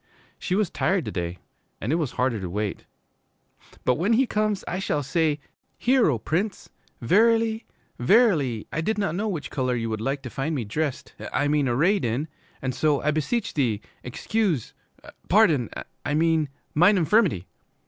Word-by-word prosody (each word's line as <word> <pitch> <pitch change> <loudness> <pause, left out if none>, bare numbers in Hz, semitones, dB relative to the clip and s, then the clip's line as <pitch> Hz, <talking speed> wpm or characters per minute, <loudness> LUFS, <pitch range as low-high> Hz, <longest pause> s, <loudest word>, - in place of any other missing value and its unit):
She 180 - -1
was 205 -3 +1
tired 190 -3 0
to - - -4
day 85 0 -3 0.4
and 110 - -2
it - - +2
was 155 -7 -2
harder 125 -3 0
to 95 -2 -5
wait. 105 +2 -3 1.0
'But 125 +2 +2
when 200 +7 +2
he 260 +4 +4
comes 215 -3 0
I 180 - -2
shall 150 -6 -1
say, 150 +1 +1 0.4
"Hear, 250 -5 +3
O 130 - +1
Prince. 180 - -2 0.3
Verily, 225 - +3 0.3
verily, 140 - +3
I 160 - 0
did 215 +6 -1
not 200 -6 0
know 205 +5 -1
which 170 -8 -4
color 130 -3 0
you 115 -1 -2
would 110 -1 -3
like 135 +3 -2
to 125 - -7
find 150 +4 -2
me 130 - -1
dressed 135 +6 -3 0.2
I 145 0 +1
mean 145 -2 +2
arrayed 175 +12 +2
in, 120 +7 -1 0.4
and 130 -1 -1
so 150 +2 +2
I 150 - +2
beseech 155 +10 -1
thee 120 -8 +1 0.2
excuse 175 - -1 0.6
pardon, 165 - +4 0.3
I 145 - -1
mean, 160 -2 +2 0.2
mine 180 +7 +5
infirmity."' 175 - +2
155 Hz, 170 wpm, -25 LUFS, 125-200 Hz, 1.0 s, mine